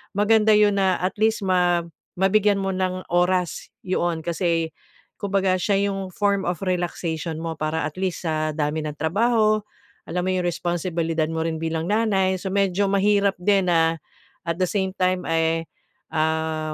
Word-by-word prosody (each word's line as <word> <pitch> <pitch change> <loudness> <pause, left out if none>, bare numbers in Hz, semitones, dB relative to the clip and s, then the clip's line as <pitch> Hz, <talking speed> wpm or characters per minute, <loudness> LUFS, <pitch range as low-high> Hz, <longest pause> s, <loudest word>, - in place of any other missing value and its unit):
maganda 215 +1 +4
'yon 205 -1 +3
na 190 -1 +3
at 185 +1 -1
least 220 -1 +2
ma 180 -2 +2 0.3
mabigyan 200 +2 +3
mo 195 0 -1
ng 185 0 -2
oras 180 0 +1 0.2
'yon 175 -3 -1
kasi 170 -1 0 0.5
kumbaga 195 -2 +1
siya 200 +1 +2
'yong 195 -1 -4
form 200 -2 +1
of 175 +1 -4
relaxation 175 -2 -2
mo 165 0 -4
para 155 +1 -1
at 155 - -4
least 185 -2 -2
sa 155 -1 0
dami 150 0 -1
ng 150 -1 -5
trabaho, 215 +6 +2 0.5
alam 180 +2 -1
mo 185 - +1
'yong 180 -1 0
responsibilidad 170 -2 -1
mo 160 0 -2
rin 160 -1 -2
bilang 160 0 -2
nanay, 195 -4 +2
so - - -4
medyo 195 0 +1
mahirap 200 0 +2
din 195 +1 +2
na 165 -1 +2 0.5
at 170 - 0
the 185 - +2
same 190 0 -2
time 185 0 +1
eh, 165 0 +1 0.5
ah, 160 0 0
180 Hz, 160 wpm, -23 LUFS, 165-195 Hz, 0.5 s, maganda